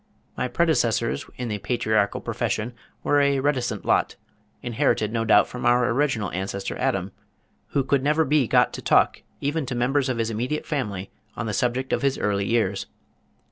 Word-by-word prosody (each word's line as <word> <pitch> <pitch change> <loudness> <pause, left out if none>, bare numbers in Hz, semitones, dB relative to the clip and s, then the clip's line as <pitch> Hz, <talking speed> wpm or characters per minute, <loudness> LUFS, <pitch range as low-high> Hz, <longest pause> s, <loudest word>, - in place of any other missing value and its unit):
My 125 - -1
predecessors 120 -5 +1
in 125 - -3
the 105 -2 -3
patriarchal 110 -3 0
profession 115 +4 -2 0.3
were 145 0 +3
a 140 -1 +2
reticent 125 -7 -1
lot, - - +2 0.5
inherited 110 -2 0
no 115 -1 0
doubt 105 -1 +5
from 125 0 -7
our 120 0 +4
original 125 -6 0
ancestor 95 +1 -3
Adam, 95 0 0 0.6
who 140 - 0
could 135 0 +1
never 150 +3 +2
be 145 -3 +2
got - - +3
to - - -6
talk - - +3 0.2
even 145 +2 -1
to 125 - -3
members 130 +3 +1
of 125 - -1
his 115 0 -1
immediate 125 +7 -2
family 105 -10 -3 0.2
on 105 - -3
the 105 - -2
subject 125 +2 0
of - - +1
his 140 -1 +1
early 100 -1 0
years. 100 -4 0
120 Hz, 175 wpm, -24 LUFS, 105-135 Hz, 0.6 s, doubt